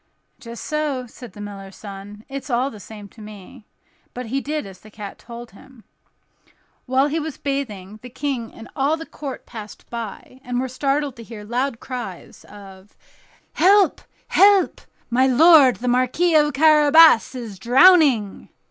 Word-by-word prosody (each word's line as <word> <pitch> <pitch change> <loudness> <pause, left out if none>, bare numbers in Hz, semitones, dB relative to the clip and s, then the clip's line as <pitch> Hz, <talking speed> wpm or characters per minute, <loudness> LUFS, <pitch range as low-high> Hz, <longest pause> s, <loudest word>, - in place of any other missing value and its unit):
"Just 235 -1 -9
so," 300 -4 -2
said 245 0 -13
the 205 - -11
miller's 195 -2 -9
son, 205 +1 -11
"it's 275 +1 -8
all 255 +3 0
the 215 - -12
same 205 0 -11
to 220 - -16
me;" 210 +3 -13 0.5
but 250 0 -6
he 265 +5 -3
did 300 -2 -4
as 190 -2 -12
the 215 - -16
cat 205 -2 -10
told 235 0 -11
him. 235 +3 -18 1.0
While 260 +2 +2
he 300 +3 -1
was 310 -2 -6
bathing, 215 -8 -5
the 250 - -10
King 260 -3 -4
and 225 - -12
all 285 +4 0
the 325 - -8
court 280 -5 -8
passed 215 -3 -11
by, 235 +2 -8
and 245 -2 -3
were 260 - -2
startled 275 +1 -2
to 230 - -10
hear 220 -2 -10
loud 240 +3 -3
cries 240 -9 -8
of 195 -1 -15 0.6
"Help! 395 +1 +3 0.3
help! 400 -1 +4 0.3
my 260 +2 +3
lord 280 -1 +6
the 250 - -6
Marquis 255 +8 +1
of 300 -1 +4
Carabas 305 -3 +5
is 225 -6 -8
drowning." 260 - +4
250 Hz, 160 wpm, -21 LUFS, 215-285 Hz, 1.0 s, lord